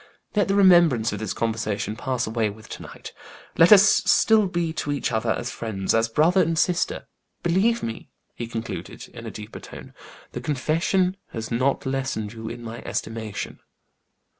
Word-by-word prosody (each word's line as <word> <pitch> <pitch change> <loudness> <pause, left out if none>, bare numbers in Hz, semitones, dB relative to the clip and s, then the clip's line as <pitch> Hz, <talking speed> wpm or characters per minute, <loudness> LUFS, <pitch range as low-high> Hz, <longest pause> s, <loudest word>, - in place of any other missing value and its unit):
Let 205 - +3
the 195 - +1
remembrance 170 - +5
of 105 - -4
this 110 -3 -3
conversation 110 -2 -2
pass 125 0 -2
away 110 -1 0
with 110 +1 -12
to - - -7
night; - - -10 0.4
let 165 +3 +6
us 200 -2 +10
still 215 0 +4
be 170 -3 -2
to 145 - -3
each 145 - -1
other 110 0 -1
as 120 +2 -1
friends 100 -5 -2
as 115 0 +2
brother 165 +10 +3
and 165 -1 0
sister. 180 - 0 0.4
Believe 195 +7 +2
me," 115 -1 -5 0.2
he 120 - -6
concluded, 115 0 -6
in - - -10
a - - -3
deeper 105 +1 -9
tone, - - -11 0.4
"the 125 - -6
confession 165 +7 0 0.2
has 115 0 -5
not 130 +4 0
lessened 130 -5 -2
you 110 -1 -7
in 120 +1 -8
my 115 0 -7
estimation." 110 -2 -5
125 Hz, 170 wpm, -24 LUFS, 110-170 Hz, 0.4 s, us